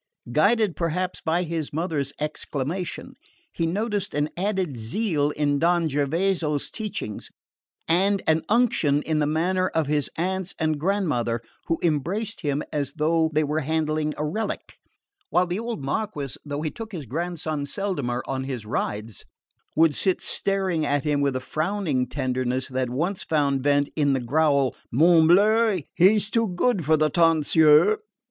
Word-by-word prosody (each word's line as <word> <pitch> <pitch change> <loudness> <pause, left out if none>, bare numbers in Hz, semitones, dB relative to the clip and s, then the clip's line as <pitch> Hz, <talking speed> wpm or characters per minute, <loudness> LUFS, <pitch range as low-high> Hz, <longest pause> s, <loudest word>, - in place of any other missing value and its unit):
Guided 205 - +3
perhaps 180 +2 -2
by 170 +3 0
his 165 -3 -3
mother's 150 -3 -2
exclamation, 150 +3 -4 0.4
he 165 - -1
noticed 205 +1 -2
an 145 +1 0
added 190 -5 -1
zeal 145 - 0
in 145 -1 0
Don 170 +1 +2
Gervaso's 150 +1 0
teachings 210 - -5 0.6
and 195 +4 +2
an 160 0 +3
unction 205 - +2
in 155 -1 0
the 150 - +1
manner 180 +4 +1
of 160 -3 0
his 145 -1 0
aunts 190 +2 -2
and 155 -2 0
grandmother, 150 - 0 0.3
who 165 - +1
embraced 180 +8 -1
him 145 -2 -1
as 140 -2 -2
though 160 +1 +2
they 155 0 +2
were 150 +1 -1
handling 155 0 -1
a 150 - -1
relic; 215 +9 -3 0.6
while 180 - +3
the 180 +3 -3
old 230 - -4
Marquess, 145 - -3
though 145 0 -4
he 155 - -2
took 225 -1 -8
his 160 -6 -5
grandson 155 +2 -3
seldomer 140 -8 -2
on 130 -1 -3
his 125 -5 -5
rides, 105 0 -3 0.5
would 160 -1 +4
sit 185 +5 +1
staring 190 -5 0
at 145 -2 0
him 150 -2 +1
with 140 -2 +1
a - - 0
frowning 155 -2 -1
tenderness 130 -1 -2
that 130 -1 -1
once 170 +10 -2
found 140 -4 +1
vent 145 +1 +2
in 145 -3 +2
the 135 - +1
growl 140 0 +2 0.2
"Morbleu, 180 - +5
but 175 - -4
he's 205 +3 +4
too 230 -1 +2
good 190 +1 0
for 155 +2 +3
the 155 0 +2
tonsure!" 165 +3 +5
155 Hz, 155 wpm, -24 LUFS, 145-185 Hz, 0.6 s, Morbleu